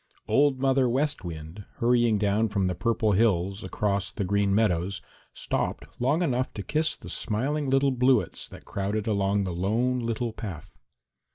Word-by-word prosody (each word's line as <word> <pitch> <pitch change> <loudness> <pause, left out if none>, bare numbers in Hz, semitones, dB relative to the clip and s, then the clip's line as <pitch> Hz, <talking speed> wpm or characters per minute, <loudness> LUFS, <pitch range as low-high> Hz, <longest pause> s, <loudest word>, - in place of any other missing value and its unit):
Old 140 -2 +3
Mother 135 -1 +3
West 140 0 0
Wind, 80 +3 -7
hurrying 120 -2 +3
down 105 +2 +1
from 100 -2 0
the 90 - 0
Purple 110 +2 +1
Hills 100 -2 +1
across 100 0 -1
the - - -4
Green 100 +1 +1
Meadows, 100 -3 +1 0.3
stopped - - -3
long 145 +8 +2
enough 130 -5 0
to 100 - -4
kiss 155 +6 0
the - - -13
smiling 135 +6 -1
little 135 +1 +3
bluets 125 -2 +1
that - - -13
crowded 100 +2 -2
along 100 -1 +1
the 90 -2 -3
Lone 115 +8 0
Little 115 0 -2
Path. 100 -9 -7
110 Hz, 160 wpm, -27 LUFS, 100-125 Hz, 0.3 s, Old